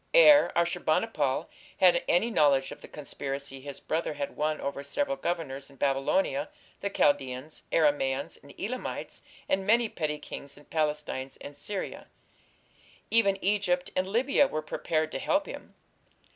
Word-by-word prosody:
Ere 300 -13 +8
Ashur 170 +1 +1
bani 155 +8 +2
pal 145 -12 -1 0.3
had 180 -2 +5
any 220 +7 +3
knowledge 140 -7 +3
of - - -9
the - - -10
conspiracy 140 -2 -5
his 140 0 -6
brother 160 -1 -2
had 140 -1 -4
won 155 0 0
over 140 0 -4
several 275 - 0
governors 160 - -3
in 140 - -17
Babylonia, 145 - +1 0.3
the 200 - -2
Chaldaeans, 145 -4 0
Aramaeans 140 -3 +1
and 140 - -15
Elamites, 250 +6 -4 0.3
and 190 0 0
many 230 +2 +4
petty 150 -5 -2
kings 140 -1 -8
in 145 - -16
Palestine 150 -4 -1
and 145 - -9
Syria: 190 +6 -5 1.0
even 200 -4 +4
Egypt 190 -2 +1
and 185 0 +1
Libya 260 +7 +3
were 155 0 -3
prepared 155 0 -1
to - - -3
help 295 0 +1
him. - - -9
155 Hz, 150 wpm, -29 LUFS, 140-200 Hz, 1.0 s, Ere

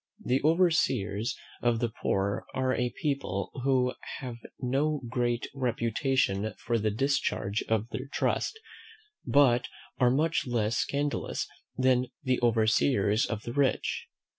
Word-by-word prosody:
The 130 +2 +2
overseers 135 - +2 0.2
of 120 -1 +2
the 120 -1 0
poor 100 +1 0
are 130 -1 +1
a 125 -1 0
people 135 - -2
who 130 -2 +2 0.3
have 125 -3 -6 0.2
no 140 +4 0
great 120 0 0
reputation 115 -4 0
for 115 -1 -1
the 110 0 +1
discharge 110 -3 0
of 110 0 +1
their 130 +2 -5
trust, 445 - -1 0.7
but 130 -4 +4 0.3
are 125 - +5
much 150 +3 +1
less 115 -2 0
scandalous 145 +1 -1 0.3
than 130 -1 +3 0.2
the 130 -2 +1
overseers 110 -2 +3
of 110 -1 -4
the 120 - -5
rich. 140 -1 0
125 Hz, 125 wpm, -29 LUFS, 110-135 Hz, 0.7 s, are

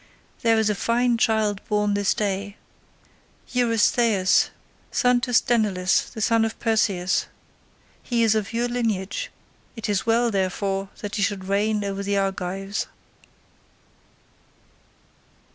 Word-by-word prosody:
There 225 -1 +3
is 220 -1 +2
a 210 - +2
fine 235 +3 +1
child 215 -3 +1
born 210 -1 +1
this 200 -1 +1
day, 200 0 -2 0.9
Eurystheus, 230 -4 +3 0.4
son 250 -1 +2
to 245 - -3
Sthenelus 210 -6 +2
the 220 - -7
son 230 0 +3
of 225 0 -2
Perseus; 200 -5 +1 0.7
he 235 -2 0
is 220 -1 +4
of 215 -1 -1
your 235 +1 0
lineage; 230 - -2 0.5
it 225 -1 -5
is 205 -3 0
well, 235 +1 +3
therefore, 195 0 -1
that 205 0 -4
he - - -1
should 200 -2 -1
reign 205 +2 0
over 200 0 -3
the 200 0 -1
Argives. 195 +1 -2
210 Hz, 125 wpm, -24 LUFS, 195-230 Hz, 0.9 s, is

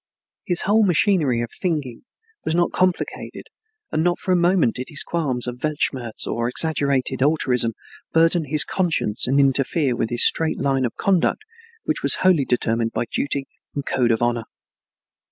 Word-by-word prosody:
His 175 -2 0
whole 205 +4 +3
machinery 170 - +2
of 120 - -5
thinking 150 - -4 0.4
was 160 - -1
not 175 0 +1
complicated 185 -1 -2 0.4
and 155 - 0
not 175 0 +1
for 185 - -3
a - - +4
moment 175 -7 +2
did 125 - -5 0.2
qualms 140 -8 -1
of 125 0 -6
"Weltschmerz" 135 -6 -1
or 115 0 -2
exaggerated 140 -2 +1
altruism 130 -5 +2 0.4
burden 165 0 +2
his 150 +1 +3
conscience 165 - -1
and 135 +2 +2
interfere 135 0 +1
with 115 - -2
his 120 0 +4
straight 160 -1 +1
line 135 -1 0
of 120 - -4
conduct 195 - +1 0.4
which - - -2
was - - +5
wholly 170 -7 +4
determined 115 -2 0
by - - -1
duty 140 -1 -2 0.3
and 140 - -4
code 125 -2 +1
of 115 0 +1
honor. 120 -1 -1
140 Hz, 160 wpm, -21 LUFS, 125-170 Hz, 0.4 s, was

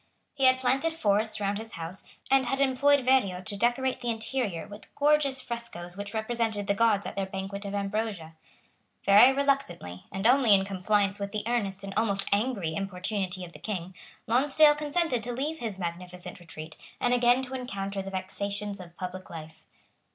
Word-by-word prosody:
He 270 -2 +1
had 255 0 +5
planted 270 +6 +1
forests 215 -5 +1
round 200 0 -1
his 225 0 -8
house, 165 +3 -6 0.3
and 270 -1 +4
had 270 - -1
employed 275 0 +3
Verrio 250 -9 +3
to 205 - -2
decorate 240 +4 +1
the 240 - -2
interior 225 -6 -2
with 205 +1 -12
gorgeous 285 -3 +2
frescoes 205 -7 -5
which 205 +2 -6
represented 220 -2 0
the 200 - +2
gods 210 -1 +3
at - - -5
their 195 -1 -1
banquet 195 +1 -5
of 200 0 -4
ambrosia. 200 -5 -2 0.7
Very 205 +6 +8
reluctantly, 275 - -1
and 195 +2 -4
only 245 -3 +6
in 195 0 +2
compliance 200 +1 +1
with 200 0 -4
the 210 -1 -3
earnest 200 -5 -1
and 195 0 -6
almost 200 -3 +1
angry 200 -6 0
importunity 190 0 -3
of 170 - -13
the - - -12
King, 185 -4 -4 0.3
Lonsdale 285 +6 +5
consented 300 -3 0
to 240 +2 -4
leave 300 +6 -3
his 220 -5 -3
magnificent 180 0 -6
retreat, 160 -2 -9 0.2
and 245 - +2
again 245 +1 +4
to 260 0 -7
encounter 200 -6 -4
the 195 - -6
vexations 200 +2 -4
of 175 -1 -12
public 185 0 -6
life. 160 -1 -10
210 Hz, 175 wpm, -28 LUFS, 195-250 Hz, 0.7 s, Very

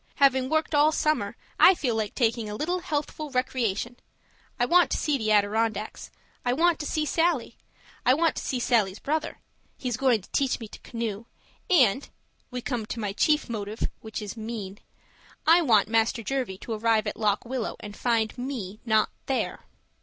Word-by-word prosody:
Having 265 -2 +3
worked 315 0 0
all 295 +1 +5
summer, 305 0 0 0.2
I 375 - +8
feel 260 -8 -1
like 220 -2 -2
taking 230 -3 0
a 210 - -4
little 350 +9 -1
healthful 305 -2 -3
recreation; 245 -3 -1 0.6
I 245 - +3
want 350 +6 +5
to - - 0
see 300 - +1
the 220 -5 0
Adirondacks; 215 +1 0 0.3
I 245 - +1
want 335 +4 +3
to 295 - -3
see 310 -1 0
Sallie; 325 -6 +1 0.5
I 255 - +5
want 330 +1 +2
to - - -3
see 255 - -2
Sallie's 215 -6 +2
brother 310 +5 -2 0.4
he's 245 -3 -3
going 255 -6 +2
to - - -18
teach 275 -3 +1
me 225 - -7
to - - -11
canoe 230 -2 -5 0.4
and 270 - +4 0.4
(we 250 -1 -5
come 235 -5 -3
to 230 - -5
my 205 -3 -2
chief 300 +7 +2
motive, 215 -2 -3
which 220 -1 -6
is 205 - -6
mean) 215 -3 -6 0.7
I 335 +2 +6
want 225 - +4
Master 225 +1 +1
Jervie 250 -5 -2
to 230 - -4
arrive 220 0 +2
at 210 - -3
Lock 210 0 0
Willow 250 -1 -3
and 205 -1 -8
find 225 -2 0
me 230 -6 -5
not 220 -2 +2 0.2
there. 270 - -2
240 Hz, 180 wpm, -26 LUFS, 215-285 Hz, 0.7 s, I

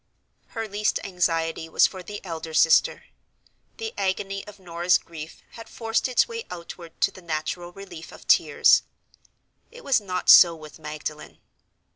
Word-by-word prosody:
Her 225 -1 -2
least 210 +1 0
anxiety 165 -3 -1
was - - +5
for 185 - -4
the 205 +2 -9
elder 160 -2 -6
sister. 160 +1 +4 0.7
The 450 0 -5
agony 195 +1 -2
of 210 - -11
Norah's 175 -1 +1
grief 160 -1 -11
had 230 - -11
forced 225 +2 -1
its 255 - +2
way 460 -1 -6
outward 170 -1 -10
to - - +3
the 185 - -14
natural 170 +1 -4
relief 185 -3 -11
of - - -15
tears. - - +5 0.9
It 485 0 -14
was 265 -5 +2
not 185 -3 -4
so 170 -2 +9
with 155 0 -13
Magdalen. 150 0 -7
180 Hz, 150 wpm, -25 LUFS, 165-205 Hz, 0.9 s, so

